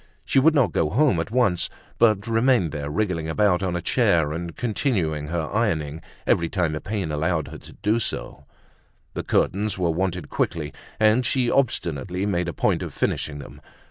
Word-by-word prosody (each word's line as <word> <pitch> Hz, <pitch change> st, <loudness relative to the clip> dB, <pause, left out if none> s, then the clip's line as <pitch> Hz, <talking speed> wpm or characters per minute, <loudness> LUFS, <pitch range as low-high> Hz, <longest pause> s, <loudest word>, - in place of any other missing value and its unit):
She -, -, +3 dB
would 160 Hz, +4 st, +4 dB
not 135 Hz, -5 st, +3 dB
go 75 Hz, -, +1 dB
home 125 Hz, -, +3 dB
at 80 Hz, -, -3 dB
once, 115 Hz, -7 st, +2 dB, 0.3 s
but 110 Hz, -3 st, +4 dB
remained 115 Hz, -, +2 dB
there 75 Hz, -1 st, -4 dB
wriggling 85 Hz, -2 st, -1 dB
about 95 Hz, +1 st, +2 dB
on 90 Hz, -2 st, -1 dB
a 85 Hz, -, -3 dB
chair, 85 Hz, -, +2 dB
and 85 Hz, +1 st, -5 dB
continuing 95 Hz, -, -1 dB
her 80 Hz, -1 st, -2 dB
ironing 80 Hz, -9 st, 0 dB, 0.2 s
every 85 Hz, -1 st, +2 dB
time 90 Hz, -4 st, 0 dB
the 75 Hz, -, -4 dB
pain 95 Hz, -6 st, -3 dB
allowed 80 Hz, +1 st, -1 dB
her -, -, -9 dB
to -, -, -13 dB
do 110 Hz, +3 st, +2 dB
so; 110 Hz, -, -4 dB, 0.7 s
the -, -, -3 dB
curtains 100 Hz, +1 st, 0 dB
were 90 Hz, -3 st, +1 dB
wanted 90 Hz, +1 st, -2 dB
quickly 80 Hz, -4 st, -2 dB, 0.3 s
and 110 Hz, +3 st, +4 dB
she 125 Hz, 0 st, +1 dB
obstinately 90 Hz, -, 0 dB
made 90 Hz, -4 st, 0 dB
a -, -, -1 dB
point -, -, +1 dB
of -, -, -6 dB
finishing 75 Hz, -1 st, -1 dB
them. 70 Hz, -, -11 dB
90 Hz, 180 wpm, -24 LUFS, 80-110 Hz, 0.7 s, would